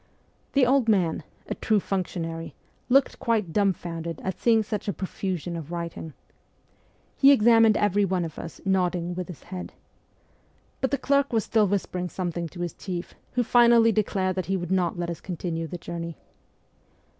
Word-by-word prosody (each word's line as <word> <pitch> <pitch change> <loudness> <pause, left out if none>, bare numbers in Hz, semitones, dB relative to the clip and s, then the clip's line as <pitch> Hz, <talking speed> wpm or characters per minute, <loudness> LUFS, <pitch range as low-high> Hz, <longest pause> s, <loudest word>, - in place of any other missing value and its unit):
The 275 -2 +5
old 255 -2 +3
man 180 -8 +2 0.3
a - - -2
true 215 -2 +1
functionary 165 -4 -4 0.3
looked 270 +2 +3
quite 215 -8 0
dumbfounded 170 -5 -1
at 190 - -3
seeing 225 -2 +4
such 210 -1 -4
a 200 - 0
profusion 180 -2 -4
of 165 -1 -7
writing. 170 -2 -5 1.0
He 275 0 +7
examined 225 -3 +6
every 205 0 +2
one 185 -3 0
of 160 - -8
us, 165 - -8
nodding 180 -2 +1
with 180 0 -4
his 180 -5 -10
head. 185 -1 -7 1.1
But 265 - 0
the 280 - 0
clerk 280 +1 +2
was 225 -3 +2
still 215 -2 +2
whispering 180 -2 -2
something 175 -1 -3
to 175 - -8
his 175 -1 -3
chief, 180 -3 -6 0.2
who 250 - +2
finally 235 -1 +5
declared 190 -3 0
that 185 -3 -2
he 195 0 +1
would 175 -1 -5
not 180 -2 +1
let 175 0 -2
us 170 - -7
continue 165 -2 -4
the 175 - -6
journey. 170 -1 -6
185 Hz, 165 wpm, -26 LUFS, 170-215 Hz, 1.1 s, He